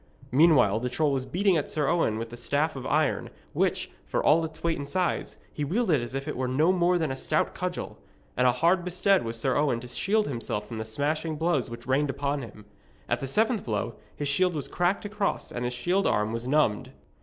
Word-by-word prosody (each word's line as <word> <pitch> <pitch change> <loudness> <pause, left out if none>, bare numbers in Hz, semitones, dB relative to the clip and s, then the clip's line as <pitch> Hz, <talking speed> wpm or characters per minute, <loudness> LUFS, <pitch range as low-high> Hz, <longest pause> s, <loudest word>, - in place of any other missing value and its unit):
Meanwhile, 130 -8 +5
the 125 +2 -2
troll 150 +3 +1
was 130 -1 -1
beating 190 -1 +2
at 145 - -2
Sir 150 -3 0
Owen 150 -11 +1
with 115 0 -5
the - - -7
staff 145 +6 0
of 130 -1 -5
iron, 155 0 +1 0.2
which, - - 0 0.2
for - - -1
all 165 +2 +5
its 160 0 -6
weight 165 -2 0
and 140 0 -6
size, 185 -2 -1 0.2
he 150 - -3
wielded 170 - +1
as 120 +2 -5
if 135 +2 -4
it 150 - -3
was 130 0 -1
no 150 +7 +3
more 180 -1 +3
than 160 -5 -1
a - - -2
stout - - 0
cudgel. - - -4 0.4
And 125 +1 +3
hard 170 +8 +3
bestead 185 +2 +2
was 115 0 -4
Sir 130 +2 0
Owen 145 -5 +2
to 125 - -8
shield 210 - 0
himself 115 -5 -3
from 110 0 -6
the 110 - -3
smashing 150 +7 -2
blows 150 -5 0
which 120 0 -9
rained 135 +3 +1
upon 140 +1 -1
him. 110 -3 -11 0.4
At - - 0
the 135 - -4
seventh 220 - +1
blow 105 -3 -2 0.2
his 145 - -3
shield 175 +5 +2
was 145 - -2
cracked 180 +4 0
across 205 -1 -2
and 120 0 -3
his 125 - -2
shield 180 +10 +1
arm 105 +1 +1
was 115 +2 -4
numbed. 130 -3 +1
145 Hz, 225 wpm, -27 LUFS, 125-170 Hz, 0.4 s, Meanwhile